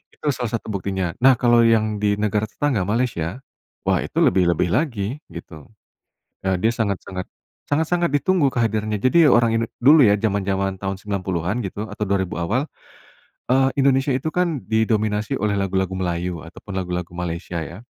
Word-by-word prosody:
Itu 150 - -3
salah 120 -4 -4
satu 110 - -6
buktinya. 95 -3 -2
Nah, 130 +1 +6
kalau 120 -1 +4
yang 110 -2 +2
di 105 0 +1
negara 105 0 0
tetangga, 125 -5 -1
Malaysia, 115 -3 -1 0.4
wah, - - +2
itu - - -2
lebih-lebih 90 -1 +2
lagi, 120 - -1
gitu. 80 -3 -10 0.8
Eee, 95 -1 +1
dia 110 +5 +2
sangat-sangat 100 -4 -3 0.4
sangat-sangat 160 +1 0
ditunggu 165 +2 +2
kehadirannya. 110 -4 0
Jadi 165 +5 +5
orang 120 -4 +4
Indo 115 - -1 0.2
dulu, 145 0 +7
ya, 100 - +5
jaman-jaman 100 -2 -1
tahun 95 0 -4
90-an, 95 -1 -2
gitu, 100 +2 -6
atau 105 0 -3
2000 95 -2 -1
awal, 115 - -1 0.8
eee, 130 +1 +3
Indonesia 135 0 +3
itu, 135 +5 -1
kan, 170 -6 -1
didominasi 110 -1 0
oleh 105 0 0
lagu-lagu 95 -1 -1
Melayu 90 -2 -3
atau 80 - -12
pun 100 - -9
lagu-lagu 90 -2 -3
Malaysia, 85 0 -4
ya. 85 +9 -10
105 Hz, 155 wpm, -22 LUFS, 95-125 Hz, 0.8 s, dulu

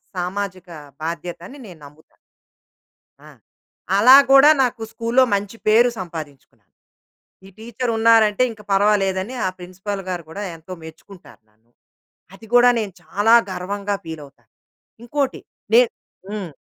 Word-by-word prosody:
సామాజిక 185 0 -5 0.3
బాధ్యతని 170 - -6
నేను 175 -4 -13
నమ్ముతాను. 150 +2 -19 1.1
ఆ! - - -14 0.7
అలా 250 +5 +8 0.2
కూడా 275 +2 +8
నాకు 245 -2 -2
స్కూల్‌లో 230 +3 +2
మంచి 200 +2 -3
పేరు 225 +3 +5
సంపాదించుకున్నాను. 155 -6 -10 0.8
ఈ - - -13
టీచర్ 235 +2 -4
ఉన్నారంటే, 225 -1 +4
ఇంక 220 -2 -12
పరవాలేదని, 195 +2 +1
ఆ - - +1
ప్రిన్సిపాల్ 190 +3 -7
గారు 175 -2 -4
కూడా, 200 +5 -7
ఎంతో 165 +3 -13
మెచ్చుకుంటారు 170 +4 -15
నన్ను. 110 +2 -38 0.6
అది 225 +3 -15
కూడా 245 0 +6
నేను 210 -4 -4
చాలా 205 +7 +2 0.2
గర్వంగా 200 +2 -4
ఫీలవుతాను. 150 -4 -11 0.5
ఇంకోటి 275 +2 -2 0.3
నే 240 - +8 0.5
హ్మ్. 205 -5 -5
200 Hz, 120 wpm, -20 LUFS, 175-230 Hz, 1.1 s, అలా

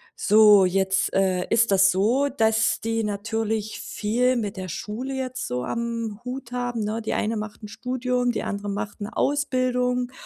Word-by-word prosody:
So, 210 -1 +6
jetzt, 190 +1 +1
äh, 185 -2 +1
ist 230 -1 +3
das 195 0 +5
so, 235 +10 +2
dass 225 -4 +2
die 225 0 -1
natürlich 220 +1 -2
viel 245 +4 0
mit 210 -4 -3
der 185 -1 -5
Schule 225 - -5
jetzt 255 -1 -4
so 125 0 -3
am 230 -2 -3
Hut 250 -1 -6
haben, 245 -1 -2
ne? 215 +2 -2
Die 220 - -3
eine 220 +2 -1
macht 210 0 -6
'n - - -6
Studium, 250 +2 -1
die - - -3
andere 205 0 -4
macht 205 +1 -5
'ne 205 - -6
Ausbildung 250 -3 0
225 Hz, 170 wpm, -24 LUFS, 205-250 Hz, -, So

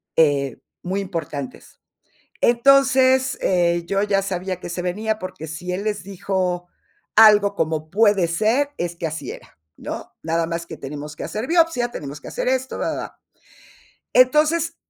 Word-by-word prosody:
eh, 140 -5 +2 0.2
muy 185 +2 -2
importantes. 165 -8 -6 0.6
Entonces, 260 +1 +4
eh, 175 -2 +1
yo 195 +2 0
ya 200 -1 +1
sabía 185 -1 -3
que - - -7
se 175 +1 -4
venía, 215 +5 -2
porque 185 -4 -7
si 170 +3 -5
él 195 +3 -3
les 210 -3 -2
dijo 185 -2 -2 0.5
algo 210 -2 +7
como 155 -3 -2
"puede 205 -3 +3
ser", 225 +11 +1
es 175 0 -3
que 170 - -3
así 155 0 -5
era, - - -12 0.2
¿no? - - -7
Nada 165 +1 0
más 170 0 -4
que 160 - -8
tenemos 150 +2 -7
que - - -6
hacer 215 +4 -4
biopsia, 330 -8 +2
tenemos 145 - -7
que - - -10
hacer - - -2
esto, 260 0 -1
va, - - -1
va, - - -4
va. - - -7 0.9
Entonces, 305 +6 +3
190 Hz, 160 wpm, -22 LUFS, 170-235 Hz, 0.9 s, algo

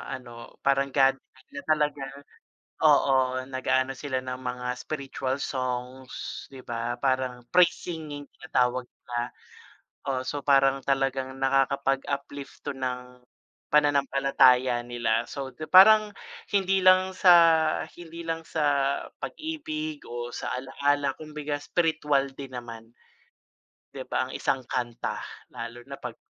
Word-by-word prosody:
ano, 120 -2 -11
parang 140 0 +3
gathering 135 -1 0
na 140 - -7
talaga 150 -2 +1 0.8
oo, 130 -1 +4
nag-aano 130 0 0
sila 130 -2 -2
ng 125 0 -5
mga 125 -1 -5
spiritual 135 -1 -4
songs, 130 0 -4
'di 130 - -9
ba 120 0 -4
parang, 130 -2 0
praise 180 -2 +5
singing 155 -4 -7
tinatawag 125 -1 0
nila. 120 0 -5 0.7
Oh, 130 -2 -2
so, 145 -1 -3
parang 135 -1 +4
talagang 135 -1 -1
nakakapag 135 0 +1
uplift 140 0 -5
to - - -2
ng, 125 -1 -5 0.5
pananampalataya 135 -4 +4
nila. 120 -1 0
So, 135 +2 -6 0.2
parang 210 +2 +8 0.4
hindi 195 -1 +2
lang 185 0 +5
sa, 180 -2 +7 0.6
hindi 170 -1 -10
lang 165 -1 -4
sa 160 - -4 0.6
pag-ibig 310 -1 -5
o 120 0 -5
sa - - -5
alaala 140 +2 0
kumbaga 150 -1 -5
spirituwal 150 -3 +1
din 135 -2 -8
naman. 115 -2 -8 1.0
'Di - - -6
ba - - -1
ang - - -9
isang 135 - 0
kanta, 120 -1 -3 0.4
lalo 115 +1 -7
na 140 0 -8
pag 125 -2 -6
135 Hz, 120 wpm, -27 LUFS, 125-145 Hz, 1.0 s, parang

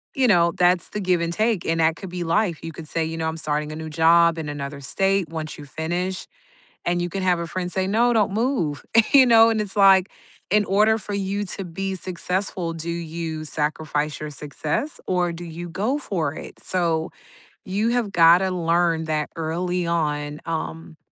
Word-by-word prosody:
you 265 -2 +3
know, 170 -5 +4
that's 180 -1 +3
the 210 - -4
give 180 -3 +1
and 170 0 -1
take, 215 -2 0
and 165 0 0
that 160 +1 +3
could 190 - -8
be 175 0 -4
life; 170 -1 0
you 165 - -5
could 155 0 -9
say, 165 +1 -1
you 160 +1 -4
know, 160 - -1
"I'm 160 - -5
starting 150 -1 -2
a - - -6
new 160 0 -6
job 165 +1 +4
in 155 -2 -4
another 140 -1 -5
state," 195 +5 0
once 160 -1 -5
you 145 - -10
finish, 175 +6 -3 0.6
and 175 0 +1
you 175 - -2
can 195 +2 -4
have 180 -2 +2
a 170 - -4
friend 180 +1 -3
say, 190 0 0
"No, 235 +4 +3
don't 210 -3 +2
move." 215 - -1 0.3
You 270 -2 +8
know, 230 -1 +7
it's 210 -3 -1
like, 195 -1 +6 0.4
in 210 0 +4
order 215 +3 +3
for 205 +1 -6
you 200 +1 -2
to 195 +1 -4
be 190 +3 -4
successful, 180 -1 -2
do 165 +1 -5
you 165 -1 -5
sacrifice 150 0 -2
your 150 - -5
success, 150 - -3
or 180 -2 +1
do 170 +1 -8
you 170 +1 -7
go 215 - -1
for 165 - -2
it? - - -10
So, 165 -3 0 0.5
you 205 +4 0
have 235 -4 0
gotta 175 +2 +5
learn 170 -1 +1
that 155 -1 -1
early 175 +2 -2
on, 150 -3 -1
um, 165 0 -5
170 Hz, 195 wpm, -23 LUFS, 160-195 Hz, 0.6 s, You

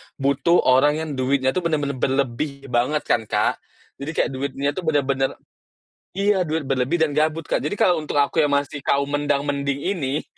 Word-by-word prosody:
butuh 140 +5 +2
orang 140 +4 +4
yang 160 - -5
duitnya 130 0 +1
tuh 185 - -1
bener-bener 145 -4 -1
berlebih 140 +2 -1
banget 125 +6 +1
kan, 110 - 0
Kak. - - 0 0.4
Jadi 145 +3 -4
kayak - - +1
duitnya 140 +1 -2
tuh 170 +1 -6
bener-bener 140 -3 +1 0.8
iya 200 -1 +2
duit 160 0 -1
berlebih 135 +5 0
dan 150 - 0
gabut, 155 +2 0
Kak. - - -1
Jadi 205 - -3
kalau 175 -4 +3
untuk 150 -1 -5
aku 145 +3 +2
yang 145 -2 +3
masih 145 0 -1
kaum 140 +1 0
mendang-mending 145 +2 -1
ini, 145 -6 -2
145 Hz, 175 wpm, -22 LUFS, 135-155 Hz, 0.8 s, orang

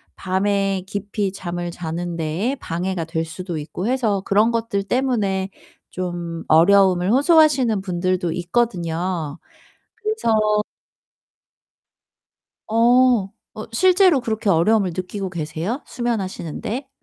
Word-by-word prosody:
밤에 195 0 0
깊이 200 0 -3
잠을 175 -2 -5
자는 170 0 -4
데에 165 - -1
방해가 180 -6 -3
될 165 0 -2
수도 170 +1 -6
있고 160 +6 -5
해서 230 -6 +1
그런 210 +4 +3
것들 230 -3 -1
때문에 200 -5 0 0.4
좀 175 -2 -4
어려움을 185 +3 +5
호소하시는 275 - +4
분들도 180 -2 -1
있거든요. 175 -5 -2 0.6
그래서 220 - +1 2.0
어. 235 -1 +4 0.3
어 215 - -7
실제로 365 - +4
그렇게 220 -3 -1
어려움을 190 +2 +3
느끼고 190 +1 -4
계세요 170 - -4
수면하시는 205 -9 -3
데? 260 +5 -4
195 Hz, 250 characters per minute, -21 LUFS, 175-230 Hz, 2.0 s, 어려움을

